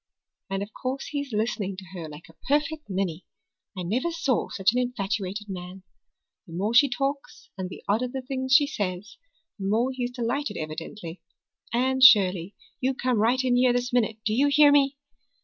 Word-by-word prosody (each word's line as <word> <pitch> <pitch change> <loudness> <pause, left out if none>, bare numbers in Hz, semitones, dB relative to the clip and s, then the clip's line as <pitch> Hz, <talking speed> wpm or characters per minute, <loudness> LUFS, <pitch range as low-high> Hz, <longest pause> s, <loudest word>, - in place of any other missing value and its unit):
And 195 0 -2
of 205 - -10
course 265 +1 -4
he's 285 -2 -4
listening 210 -3 -2
to 190 - -9
her 165 -4 -6
like 150 +2 -11
a 165 - -17
perfect 300 +1 0
ninny. 185 -3 -3 0.5
I 180 - -3
never 240 - -1
saw 325 -7 0
such 195 +1 +2
an 250 - +1
infatuated 210 -4 -3
man. 185 0 -8 0.6
The 165 - -11
more 200 +6 -1
she 275 +4 +6
talks 275 +3 -4
and 190 -1 -5
the - - -10
odder 225 +5 +1
the 260 +1 -6
things 260 0 0
she 290 - +7
says, 205 -7 -4 0.4
the 195 - -3
more 230 +6 +1
he's 250 -1 -2
delighted 245 +4 -2
evidently. 165 +3 -7 0.5
Anne 260 +2 +1
Shirley, 195 -6 +6 0.2
you 260 +1 0
come 250 -3 0
right 245 +4 +2
in 250 -1 +2
here 250 0 +4
this 245 0 -2
minute, 225 -3 +1
do 215 - +1
you 275 +6 +3
hear 290 0 +6
me!" 280 -1 +3
235 Hz, 185 wpm, -26 LUFS, 195-260 Hz, 0.6 s, she